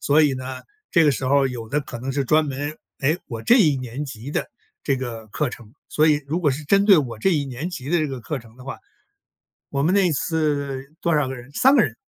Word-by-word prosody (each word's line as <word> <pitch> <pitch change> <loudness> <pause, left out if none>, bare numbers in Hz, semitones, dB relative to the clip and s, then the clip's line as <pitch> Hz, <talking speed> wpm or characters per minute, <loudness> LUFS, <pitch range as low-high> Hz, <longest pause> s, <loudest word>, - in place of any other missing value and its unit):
所 150 +2 +4
以 145 -2 +3
呢， 130 0 -6 0.3
这 170 -2 +5
个 150 - +5
时 130 -1 -2
候 140 +1 +4
有 120 -4 -6
的 145 +5 0
可 120 - -8
能 130 +3 -4
是 135 +1 -1
专 155 +4 +3
门， 145 +2 -4 0.3
诶， 150 +5 +2
我 115 -4 -6
这 240 - +5
一 155 - +4
年 130 +1 -5
级 120 +2 -8
的 - - -2 0.3
这 140 - +1
个 120 -4 -6
课 145 +5 -1
程， 120 -2 -12 0.2
所 155 +1 +3
以 150 -2 +2
如 160 +5 -1
果 150 - +3
是 145 +3 -4
针 200 +6 +3
对 200 -3 +8
我 125 -8 -1
这 115 - +2
一 150 -5 +1
年 135 +5 -5
级 150 -5 -6
的 175 - +3
这 155 - +1
个 135 -2 -5
课 150 +4 -3
程 115 -1 -16
的 125 - -13
话， 135 - -6 0.9
我 140 0 -1
们 165 +5 +2
那 200 -2 +4
一 165 - +1
次 145 -3 -1
多 170 -1 +2
少 150 -3 +2
个 130 - -4
人 125 +2 -12
3 265 - +5
个 240 - +6
人， 125 - -1
140 Hz, 275 characters per minute, -23 LUFS, 130-155 Hz, 0.9 s, 对